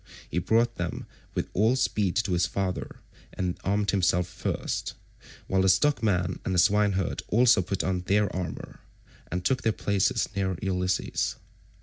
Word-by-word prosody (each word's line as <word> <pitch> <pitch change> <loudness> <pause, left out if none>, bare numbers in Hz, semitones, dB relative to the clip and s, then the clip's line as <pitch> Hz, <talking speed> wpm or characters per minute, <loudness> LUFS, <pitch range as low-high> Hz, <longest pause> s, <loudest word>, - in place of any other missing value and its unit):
He 85 - -1
brought 115 +5 +1
them 85 0 -4 0.3
with - - -1
all 110 +6 +3
speed 105 -7 0
to 105 -4 +1
his 85 -1 +2
father, 95 +1 -3 0.3
and 90 -1 -3
armed 100 +1 +1
himself 90 -2 +2
first, 90 - -3 0.5
while 95 0 +1
the 95 - +3
stockman 95 - +2
and 95 - -1
the - - +1
swineherd 100 -1 +2
also 120 -1 +5
put 95 +1 -2
on 95 -1 -1
their 105 -1 +2
armour, 90 -3 -5 0.5
and 90 +1 -3
took 130 -1 +1
their 110 - +2
places 100 -2 0
near 95 -2 -1
Ulysses. 90 -1 -1
95 Hz, 150 wpm, -27 LUFS, 90-105 Hz, 0.5 s, also